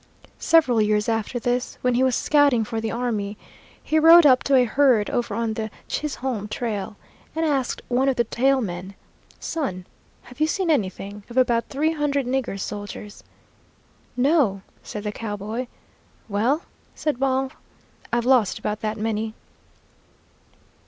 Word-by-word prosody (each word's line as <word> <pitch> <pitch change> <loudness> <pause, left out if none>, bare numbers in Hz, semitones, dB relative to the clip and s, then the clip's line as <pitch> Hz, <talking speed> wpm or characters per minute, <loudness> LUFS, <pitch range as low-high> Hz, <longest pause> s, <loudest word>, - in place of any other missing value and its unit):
Several 265 -9 +4
years 210 0 +1
after 225 +1 -1
this, 245 +1 -2
when 250 0 +2
he 245 - +2
was 260 -2 +3
scouting 285 -6 +3
for 225 +1 -4
the 225 - -2
army, 215 -4 -2 0.5
he 315 - +2
rode 330 +1 +8
up 255 -3 +6
to 275 - +3
a 255 - +6
herd 245 -3 +3
over 235 -4 -1
on 230 -1 -1
the 220 0 -4 0.2
Chisholm 260 -7 -3
trail 215 -3 -4 0.4
and 325 0 0
asked 275 -5 -1
one 255 +2 +2
of 265 - +1
the 235 - +2
tail 265 +4 +2
men: 185 -1 -5 0.4
"Son, 190 - -3 0.4
have 250 +3 -15
you 310 - +3
seen 360 0 0
anything 200 -4 -2
of 240 - -8
about 240 -2 +2
three 305 +4 +1
hundred 285 -3 0
nigger 250 -5 -2
soldiers?" 205 +1 -7 0.9
"No," 250 - +2 0.2
said 210 - -7
the 210 - -2
cowboy. 215 +3 -5 0.6
"Well," 235 - +1 0.3
said 300 -5 -2
Baugh, 265 0 +1 0.6
"I've 235 0 0
lost 250 -6 +3
about 210 0 -3
that 215 0 -2
many." 220 0 -2
240 Hz, 150 wpm, -23 LUFS, 210-270 Hz, 0.9 s, rode